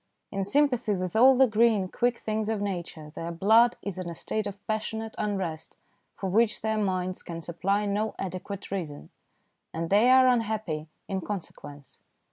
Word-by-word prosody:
In 195 -1 -1
sympathy 250 -2 +2
with 185 0 -4
all 255 +3 +7
the 265 - +7
green, 220 -4 +3
quick 240 +5 0
things 215 0 -2
of 220 -2 -1
Nature, 170 -6 -5
their 165 +1 -5
blood 220 +7 +4
is 195 -2 -4
in 180 -2 -4
a 170 - -6
state 215 +5 -2
of 200 -1 -6
passionate 220 +1 -3
unrest 190 -7 -3 0.4
for 195 - -4
which 215 +4 +2
their 220 0 0
minds 185 -2 -1
can 170 -1 -7
supply 195 +5 -1
no 210 +2 -1
adequate 190 +1 -6
reason, 165 -7 -5 0.6
and 165 +1 -4
they 215 +5 +5
are 260 0 +7
unhappy 215 -10 0 0.2
in 190 -1 -2
consequence. 155 -8 -8
200 Hz, 165 wpm, -27 LUFS, 180-220 Hz, 0.6 s, all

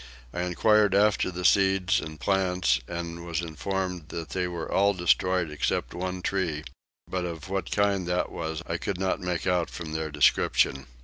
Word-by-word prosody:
I 90 - -2
enquired 100 +3 +3
after 105 -1 +3
the 90 0 -5
seeds 95 +3 +4
and 80 -5 -7
plants 90 -9 +2
and 85 0 -5
was 85 -2 -2
informed 90 0 -3
that 80 -2 -5
they 90 -1 -1
were 85 -2 -5
all 100 +1 +3
destroyed 90 -1 +2
except 75 - -1
one 90 +1 -4
tree, 85 -6 -1 0.4
but 95 -1 -2
of 85 0 -6
what 95 -1 -2
kind 100 -3 +1
that 90 0 0
was 80 -1 -4
I - - -2
could 95 -3 -3
not 95 -1 0
make 90 -2 -2
out 90 -2 +1
from 80 -3 -7
their 80 0 -2
description. 70 -1 +2
90 Hz, 175 wpm, -27 LUFS, 85-95 Hz, 0.4 s, seeds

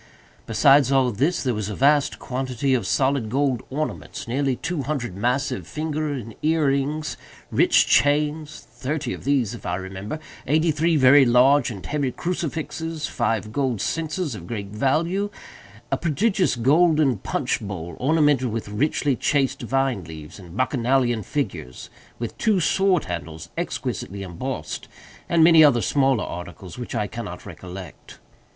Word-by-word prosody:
Besides 135 +4 +5
all 130 -2 +3
this, 145 - 0
there 125 -3 0
was 105 -1 -3
a 105 - -4
vast 145 +1 +3
quantity 130 0 -2
of 120 -7 0
solid 130 -3 +1
gold 135 0 +1
ornaments; 140 -1 -4
nearly 135 +2 0
two 170 +5 -3
hundred 130 -9 -3
massive 120 - -1
finger 155 - -2
and 120 -5 -5
earrings; 150 -1 0 0.3
rich - - +4
chains—thirty 150 -1 0
of - - -9
these, 135 -6 +1
if - - -9
I - - -2
remember; 95 +7 -5 0.3
eighty 160 +4 +3
three 160 +2 +1
very 140 0 +7
large 130 +2 +4
and 100 -6 -8
heavy 145 -3 -1
crucifixes; 160 -1 -3
five 110 -4 -1
gold 130 -3 -1
censers 160 - -2
of 85 -5 -8
great 100 -4 -5
value; 160 - 0 0.6
a 135 - +2
prodigious 185 - +1
golden 145 - +3
punch - - -1
bowl, 85 -5 -6
ornamented 145 -2 +3
with 110 -1 -4
richly 140 +5 0
chased 135 +1 0
vine 130 -4 0
leaves 80 +2 -10
and 90 0 -11
Bacchanalian 125 -2 +1
figures; 100 - -4 0.3
with 115 -1 -5
two 215 -4 +2
sword 190 0 +2
handles 80 -2 -6
exquisitely 100 +1 -4
embossed, 90 - -5 0.4
and 165 -1 +4
many 165 -1 +8
other 125 -7 +5
smaller 135 +1 +2
articles 90 +2 -8
which 120 - -6
I 105 -2 0
cannot 105 -4 -7
recollect. 90 -2 -10
135 Hz, 145 wpm, -23 LUFS, 110-150 Hz, 0.6 s, many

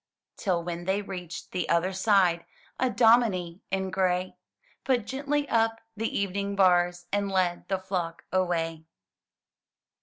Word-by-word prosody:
Till 180 -4 -1
when 175 0 -5
they 195 +2 0
reached 180 -3 -7
the 180 - -2
other 170 +3 +2
side, 190 -3 +3 0.3
A 255 - +2
dominie 205 -6 +3
in 190 0 -1
gray 185 -1 0 0.5
Put 250 -5 +1
gently 285 +3 -1
up 225 0 +1 0.2
the 225 +2 -1
evening 200 0 -1
bars, 175 -2 +3
And 200 -1 +1
led 180 -2 0
the 190 - 0
flock 180 -3 -4
away. 165 -3 -1
190 Hz, 130 wpm, -27 LUFS, 175-205 Hz, 0.5 s, side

